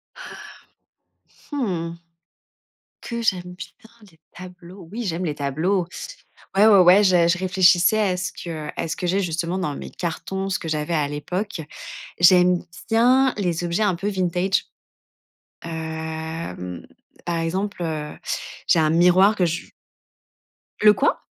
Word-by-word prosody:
Ah. -, -, -10 dB, 1.2 s
Mmh. 175 Hz, -, -2 dB, 1.1 s
Que, 235 Hz, -1 st, -4 dB
j'aime 180 Hz, -4 st, -1 dB
bien 220 Hz, +4 st, -12 dB, 0.2 s
les 160 Hz, -, -25 dB, 0.2 s
tableaux? 180 Hz, 0 st, -12 dB
Oui, 235 Hz, +2 st, -5 dB
j'aime 180 Hz, -1 st, -2 dB
les 150 Hz, -, -3 dB
tableaux. 165 Hz, +6 st, 0 dB, 0.7 s
Ouais, 210 Hz, +2 st, +7 dB
ouais, 200 Hz, -3 st, +7 dB
ouais, 185 Hz, +3 st, +7 dB
je 175 Hz, -2 st, +4 dB
je 180 Hz, -, +2 dB
réfléchissais 185 Hz, +2 st, +4 dB
à 190 Hz, -4 st, +1 dB
ce 185 Hz, 0 st, -3 dB
que 160 Hz, -3 st, -6 dB
à -, -, -3 dB
ce -, -, -2 dB
que 180 Hz, -, -3 dB
j'ai 195 Hz, +3 st, +1 dB
justement 170 Hz, +1 st, -2 dB
dans 150 Hz, -6 st, -2 dB
mes -, -, -7 dB
cartons, 190 Hz, +3 st, -4 dB
ce 190 Hz, -, -1 dB
que 165 Hz, -, -7 dB
j'avais 155 Hz, +1 st, -2 dB
à 145 Hz, -2 st, +1 dB
l'époque. 180 Hz, +6 st, -4 dB, 0.6 s
J'aime 180 Hz, 0 st, +5 dB, 0.3 s
bien 250 Hz, +4 st, +4 dB
les 175 Hz, -3 st, -1 dB
objets 175 Hz, +5 st, -1 dB
un 195 Hz, -4 st, +2 dB
peu 195 Hz, +4 st, -5 dB
vintage, 185 Hz, 0 st, 0 dB, 1.0 s
hem, 160 Hz, -, -6 dB, 0.4 s
par 170 Hz, -1 st, -1 dB
exemple, 185 Hz, +3 st, -2 dB
heu, 155 Hz, -2 st, -4 dB, 0.5 s
j'ai -, -, +5 dB
un 155 Hz, -1 st, +3 dB
miroir 180 Hz, +5 st, +5 dB
que 180 Hz, -, +2 dB
je 170 Hz, 0 st, -2 dB, 1.2 s
Le 210 Hz, 0 st, +7 dB
quoi? 280 Hz, -, 0 dB
180 Hz, 145 wpm, -22 LUFS, 165-195 Hz, 1.2 s, Ouais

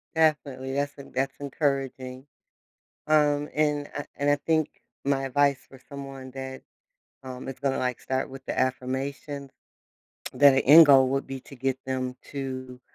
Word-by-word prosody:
Definitely. 140 Hz, -4 st, +1 dB
That's 145 Hz, +1 st, -2 dB
en 140 Hz, -, -11 dB
that's 135 Hz, +1 st, -1 dB
encouraging. 135 Hz, -2 st, -2 dB, 0.8 s
Um, 150 Hz, -1 st, +3 dB
and 150 Hz, -1 st, +1 dB
I 145 Hz, -, -4 dB
and 145 Hz, 0 st, +1 dB
I 145 Hz, -, +4 dB
think 155 Hz, +1 st, -1 dB, 0.2 s
my 135 Hz, -1 st, +1 dB
advice 140 Hz, 0 st, +2 dB
for 135 Hz, -, -15 dB
someone 135 Hz, -2 st, -8 dB
that, 130 Hz, 0 st, -7 dB, 0.6 s
um, 130 Hz, 0 st, -7 dB
is 135 Hz, -, -6 dB
gonna, 135 Hz, -1 st, 0 dB
like, 125 Hz, -1 st, -1 dB
start 130 Hz, +1 st, -2 dB
with 135 Hz, 0 st, -10 dB
the -, -, -3 dB
affirmations, 135 Hz, +2 st, -2 dB, 0.8 s
that 145 Hz, -1 st, +7 dB
the 135 Hz, -, +2 dB
end 155 Hz, +3 st, +10 dB
goal 135 Hz, -2 st, +7 dB
would 135 Hz, 0 st, -1 dB
be 135 Hz, -1 st, -6 dB
to 140 Hz, -, -14 dB
get 130 Hz, +1 st, -1 dB
them 130 Hz, -1 st, -3 dB, 0.2 s
to, 130 Hz, -2 st, -5 dB
135 Hz, 160 wpm, -26 LUFS, 130-145 Hz, 0.8 s, end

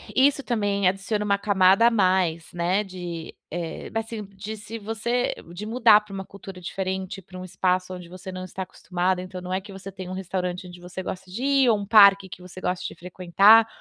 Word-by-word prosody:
Isso 280 Hz, +1 st, +4 dB
também 205 Hz, -5 st, 0 dB
adiciona 195 Hz, +3 st, -1 dB
uma 200 Hz, -1 st, +2 dB
camada 200 Hz, +2 st, +4 dB
a -, -, +4 dB
mais, 185 Hz, -6 st, +1 dB
né, 175 Hz, +4 st, +1 dB
de 175 Hz, -4 st, -7 dB, 0.2 s
eh, 165 Hz, 0 st, -5 dB
assim, 225 Hz, -1 st, -3 dB
de 200 Hz, +2 st, -8 dB
se 215 Hz, +2 st, -8 dB
você 225 Hz, +3 st, -1 dB, 0.2 s
de 195 Hz, +4 st, -6 dB
mudar 225 Hz, -2 st, +5 dB
para 210 Hz, -1 st, -13 dB
uma 195 Hz, 0 st, -5 dB
cultura 195 Hz, -1 st, -11 dB
diferente, 190 Hz, +2 st, -4 dB
para 185 Hz, 0 st, -11 dB
um 185 Hz, -, -7 dB
espaço 185 Hz, 0 st, 0 dB
onde 180 Hz, -1 st, -10 dB
você 185 Hz, +1 st, -9 dB
não 185 Hz, 0 st, -6 dB
está 185 Hz, +1 st, -5 dB
acostumada. 180 Hz, 0 st, -2 dB
Então, 185 Hz, 0 st, -8 dB
não 180 Hz, 0 st, -5 dB
é 190 Hz, -, 0 dB
que 200 Hz, -, -12 dB
você 195 Hz, +1 st, -8 dB
tem 185 Hz, -1 st, -8 dB
um -, -, -5 dB
restaurante 185 Hz, -1 st, -3 dB
onde 175 Hz, 0 st, -12 dB
você 180 Hz, +1 st, -7 dB
gosta 185 Hz, 0 st, -7 dB
de 230 Hz, +7 st, -5 dB
ir 275 Hz, -2 st, +4 dB
ou 220 Hz, -, +4 dB
um 200 Hz, -, -5 dB
parque 200 Hz, -2 st, +7 dB
que 180 Hz, -, -10 dB
você 185 Hz, +1 st, -11 dB
gosta 180 Hz, -1 st, -2 dB
de -, -, -5 dB
frequentar, 185 Hz, +6 st, +5 dB
190 Hz, 215 wpm, -25 LUFS, 180-210 Hz, 0.2 s, parque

